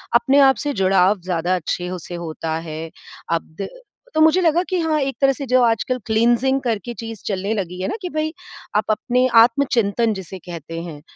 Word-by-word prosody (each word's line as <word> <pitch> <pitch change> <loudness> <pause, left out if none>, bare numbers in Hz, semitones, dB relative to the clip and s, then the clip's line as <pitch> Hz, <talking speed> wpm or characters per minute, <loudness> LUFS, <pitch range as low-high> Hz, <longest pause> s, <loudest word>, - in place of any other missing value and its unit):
अपने 265 +4 +4
आप 265 - +2
से 290 - 0
जुड़ाव 190 +1 +3
ज़्यादा 180 0 0
अच्छे 180 +1 -3
हो 180 0 -4
से 175 - -6
होता 160 -1 -4
है। 160 +1 -6 0.4
अब 165 -1 -3
द 195 - -4 0.4
तो 315 - +2
मुझे 320 +4 +5
लगा 335 0 +3
कि 370 - 0
हाँ 315 -2 +1
एक 270 -1 -2
तरह 275 0 +5
से 275 +1 -6
जो 255 +1 +4
आजकल 235 +2 +1
क्लीनसिंग 240 +4 +2
करके 235 -2 -2
चीज़ 225 -2 -7
चलने 200 +1 -1
लगी 180 -4 -4
है 190 - -1
ना - - -2
कि 360 - -3
भई 310 0 -2 0.4
आप 210 - +3
अपने 250 +4 +1
आत्मचिंतन 230 -3 +2
जिसे 190 -1 -7
कहते 165 -1 -7
हैं। 155 -4 -8
220 Hz, 200 wpm, -21 LUFS, 180-265 Hz, 0.4 s, मुझे